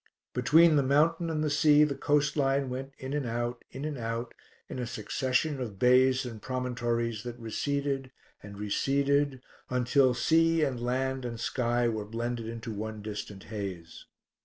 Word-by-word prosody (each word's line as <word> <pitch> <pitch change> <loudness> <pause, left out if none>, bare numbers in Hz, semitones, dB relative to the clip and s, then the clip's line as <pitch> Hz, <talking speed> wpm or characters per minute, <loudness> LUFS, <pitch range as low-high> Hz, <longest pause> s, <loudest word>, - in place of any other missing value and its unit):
Between 155 +5 +5
the - - +5
mountain 160 +5 +2
and 155 -1 -1
the 155 - +1
sea 150 0 +5
the 150 -2 +1
coastline 140 -2 +1
went 130 +2 -5
in 130 +1 -6
and 145 -4 -1
out, 120 +1 -3
in 135 +3 -6
and 150 -4 -4
out, 115 +1 -3 0.3
in - - -6
a 125 - -3
succession 130 +6 -1
of 110 -6 -5
bays 130 +3 +4
and 115 -3 -7
promontories 120 -3 -2
that 120 0 -7
receded 135 +3 -2 0.3
and 100 0 -10
receded 140 +5 +1 0.3
until 125 +1 +3
sea 165 +5 +3
and 130 -4 -1
land 130 +2 -1
and 120 -2 -5
sky 120 0 0
were 110 -2 -2
blended 115 +1 -3
into 115 0 -6
one 110 0 -5
distant 105 -2 -6
haze. 95 -5 -6
125 Hz, 160 wpm, -29 LUFS, 115-140 Hz, 0.3 s, Between